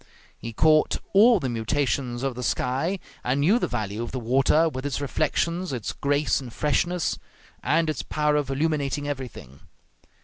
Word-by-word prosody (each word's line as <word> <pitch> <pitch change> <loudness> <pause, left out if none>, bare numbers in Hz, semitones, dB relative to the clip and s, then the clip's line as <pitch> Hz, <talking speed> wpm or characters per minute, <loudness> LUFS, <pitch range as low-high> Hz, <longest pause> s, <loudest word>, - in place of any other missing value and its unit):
He 115 - -7
caught 155 +6 +3 0.2
all 220 +2 +6
the 135 - -2
mutations 125 +1 -1
of 135 -1 -1
the 125 - -7
sky, 130 +9 -1 0.3
and 130 +3 0
knew 200 +11 +4
the - - 0
value 110 -2 -3
of 120 - -5
the 130 - -3
water, 135 +7 +3
with 130 -4 -4
its 145 -2 -2
reflections, 165 +5 -1
its 120 -5 -4
grace 145 0 0
and 125 -3 -9
freshness, 175 +6 0 0.4
and 160 +2 +2
its 155 -4 -2
power 150 -1 0
of 145 -2 0
illuminating 145 0 -1
everything. 125 - -7
140 Hz, 165 wpm, -25 LUFS, 125-155 Hz, 0.4 s, all